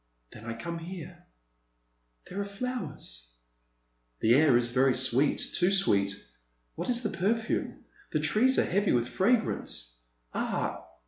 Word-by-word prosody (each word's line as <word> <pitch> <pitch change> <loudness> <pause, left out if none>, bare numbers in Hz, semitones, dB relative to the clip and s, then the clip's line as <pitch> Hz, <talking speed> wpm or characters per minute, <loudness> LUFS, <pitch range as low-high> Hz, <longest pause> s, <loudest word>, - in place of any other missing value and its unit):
Then 110 - -12
I 115 0 -4
come 170 +9 -5
here. 175 0 -9 1.0
There 195 +2 -4
are - - -3
flowers." 200 - -6 0.9
The 115 - +4
air 140 -2 +5
is 120 -1 +1
very 130 +1 +3
sweet, 130 +2 +3 0.2
too 180 0 +3
sweet. 100 - +3 0.6
What - - -5
is 245 0 +1
the 215 - 0
perfume? 220 +4 -1 0.2
The - - 0
trees 255 +5 +3
are - - +4
heavy 200 +2 +1
with 120 -1 +1
fragrance. 185 - 0 0.4
Ah - - -2
170 Hz, 135 wpm, -29 LUFS, 120-200 Hz, 1.0 s, air